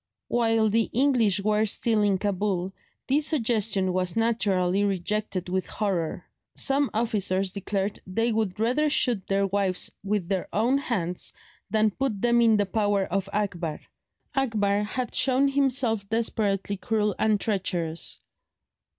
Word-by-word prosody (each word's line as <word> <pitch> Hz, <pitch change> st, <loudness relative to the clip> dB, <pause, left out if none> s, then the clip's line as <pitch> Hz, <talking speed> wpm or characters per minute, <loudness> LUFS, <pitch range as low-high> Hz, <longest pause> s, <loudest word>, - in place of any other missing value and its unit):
While 225 Hz, -2 st, +2 dB
the 225 Hz, +1 st, +2 dB
English 235 Hz, -7 st, +2 dB
were 215 Hz, +1 st, +2 dB
still 220 Hz, +1 st, +1 dB
in 200 Hz, -2 st, +2 dB
Cabul, 190 Hz, -2 st, -1 dB, 0.3 s
this 290 Hz, +3 st, +2 dB
suggestion 220 Hz, -, +1 dB
was 180 Hz, -1 st, -1 dB
naturally 205 Hz, -5 st, +1 dB
rejected 200 Hz, -1 st, -2 dB
with 185 Hz, +1 st, -2 dB
horror. 190 Hz, -7 st, -2 dB, 0.3 s
Some 275 Hz, 0 st, +2 dB
officers 200 Hz, -4 st, 0 dB
declared 200 Hz, 0 st, -3 dB
they 225 Hz, +5 st, 0 dB
would 215 Hz, -3 st, -1 dB
rather 255 Hz, +7 st, +2 dB
shoot 240 Hz, -9 st, +1 dB
their 195 Hz, 0 st, +1 dB
wives 195 Hz, -2 st, 0 dB
with 200 Hz, -3 st, -1 dB
their 190 Hz, -1 st, -1 dB
own 240 Hz, +6 st, +2 dB
hands 180 Hz, -10 st, -2 dB, 0.4 s
than 215 Hz, +1 st, +2 dB
put 240 Hz, -2 st, -2 dB
them 235 Hz, +2 st, +3 dB
in 225 Hz, -2 st, +5 dB
the 205 Hz, -, +2 dB
power 205 Hz, 0 st, +1 dB
of 195 Hz, +2 st, -2 dB
Akbar. 180 Hz, -7 st, -2 dB, 0.6 s
Akbar 210 Hz, -6 st, +1 dB
had 245 Hz, +4 st, -3 dB
shown 265 Hz, +1 st, +3 dB
himself 255 Hz, -7 st, 0 dB
desperately 205 Hz, -3 st, -1 dB
cruel 210 Hz, 0 st, 0 dB
and 215 Hz, -1 st, +2 dB
treacherous. 175 Hz, -6 st, -2 dB
210 Hz, 135 wpm, -26 LUFS, 195-230 Hz, 0.6 s, in